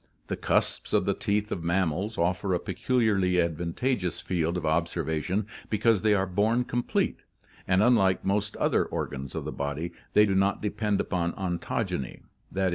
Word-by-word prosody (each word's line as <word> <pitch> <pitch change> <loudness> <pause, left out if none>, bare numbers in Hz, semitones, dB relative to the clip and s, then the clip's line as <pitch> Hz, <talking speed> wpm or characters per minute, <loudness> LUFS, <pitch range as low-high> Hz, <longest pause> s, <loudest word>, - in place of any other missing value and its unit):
The - - 0
cusps - - 0
of - - +3
the - - +2
teeth 105 +1 -1
of 85 - -3
mammals 90 +4 0
offer 90 +2 +1
a - - 0
peculiarly 100 -9 +1
advantageous 85 - -1
field 85 -1 -1
of 85 - -3
observation 85 +4 0 0.2
because 110 -1 +3
they 110 -1 +4
are 95 -1 +1
born 105 +6 +1
complete, 120 0 -1 0.5
and 95 +2 +4
unlike 105 -6 +3
most 105 +2 0
other - - +2
organs 65 0 -5
of - - -3
the - - -3
body, 75 +4 -3 0.2
they 105 - +6
do 100 - 0
not 95 +1 +2
depend 105 -1 -1
upon 85 -2 -1
ontogeny 85 -7 -3 0.3
(t. 95 - -2
95 Hz, 160 wpm, -27 LUFS, 85-105 Hz, 0.5 s, they